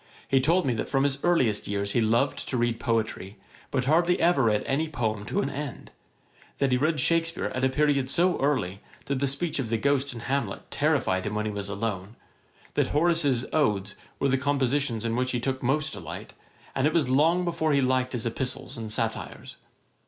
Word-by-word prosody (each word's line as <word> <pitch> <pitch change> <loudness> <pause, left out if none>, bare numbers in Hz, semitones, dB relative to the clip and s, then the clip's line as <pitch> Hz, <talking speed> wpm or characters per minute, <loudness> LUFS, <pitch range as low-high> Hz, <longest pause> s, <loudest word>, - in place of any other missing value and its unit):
He 135 -1 +3
told 165 +5 +2
me 130 - +1
that 110 - -3
from 135 -1 +2
his 140 0 -1
earliest 130 -12 +2
years 100 0 -2
he 120 - +2
loved 115 +5 +1
to 130 - -1
read 120 -1 0
poetry, 110 -5 -2 0.3
but 130 -2 -1
hardly 170 +5 +3
ever 165 -7 +3
read 105 -2 +2
any 155 +4 0
poem 110 -7 -2
to 205 - 0
an - - -1
end; 140 -2 -6 0.7
that 140 -2 +1
he 125 - +4
read 155 +2 +1
Shakspeare 165 +4 +1
at 130 - -2
a 130 - +4
period 140 -1 +1
so 175 +4 +2
early, 105 -9 0 0.2
that 140 -1 -1
the 140 - +1
speech 145 +3 -1
of 125 -5 -2
the 115 - +1
ghost 140 +3 +1
in 120 -2 -8
Hamlet 140 +4 -3
terrified 140 -11 +1
him 105 - -3
when 105 0 -1
he 105 - -1
was 100 -1 -5
alone; 100 0 -4 0.6
that - - +2
Horace's 150 -5 +2
Odes 105 -10 +1 0.2
were 140 - +1
the 135 0 +2
compositions 135 -4 0
in 115 0 0
which 130 +1 0
he 120 - 0
took 130 +2 -2
most 150 +5 0
delight, - - -8 0.4
and 135 +2 +2
it 155 - 0
was 155 -6 +2
long 160 +7 +3
before 165 -2 0
he 140 -1 +3
liked 130 0 +1
his 120 -2 -2
Epistles 125 +2 -3
and 110 -1 -5
Satires. - - -4
130 Hz, 205 wpm, -27 LUFS, 115-150 Hz, 0.7 s, he